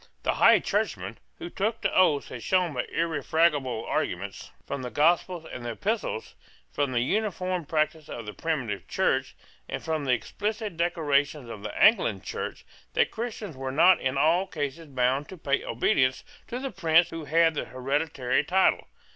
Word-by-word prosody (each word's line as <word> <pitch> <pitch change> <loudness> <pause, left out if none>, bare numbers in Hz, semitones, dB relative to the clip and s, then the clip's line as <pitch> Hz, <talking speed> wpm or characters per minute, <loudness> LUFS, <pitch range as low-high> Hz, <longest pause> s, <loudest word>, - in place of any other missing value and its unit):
The - - +1
High - - +6
Churchman - - -2 0.2
who 345 0 -7
took 220 +3 -1
the - - +1
oaths 155 -6 +3
had 120 - -7
shown 180 0 +1
by 125 - -2
irrefragable 150 -6 +1
arguments - - -3 0.2
from 140 - -4
the 125 - -4
Gospels 165 +5 +2
and 125 - -6
the 120 -1 -3
Epistles, 205 - -3 0.4
from 140 - -1
the 120 -2 +1
uniform 185 - -1
practice 155 -1 -1
of 115 - -6
the 105 - -6
primitive 130 -11 -3
Church, - - 0 0.3
and - - -4
from 155 -3 -2
the 130 - +1
explicit 210 - -3
declarations 150 -5 0
of 105 - -8
the 105 - -6
Anglican 150 - +4
Church, - - -5 0.3
that - - +2
Christians 220 - -5
were 130 0 -4
not 170 +7 +5
in 130 +1 -1
all 170 +7 +3
cases 155 0 -4
bound 130 +1 0
to 190 - -9
pay 140 -3 0
obedience 130 +2 +1 0.2
to 240 - -4
the 265 +1 -4
prince 170 -2 +3
who 165 -2 -6
had 165 +2 +3
the 150 - -3
hereditary 130 0 -1
title. 185 +5 +2
155 Hz, 170 wpm, -27 LUFS, 130-180 Hz, 0.4 s, High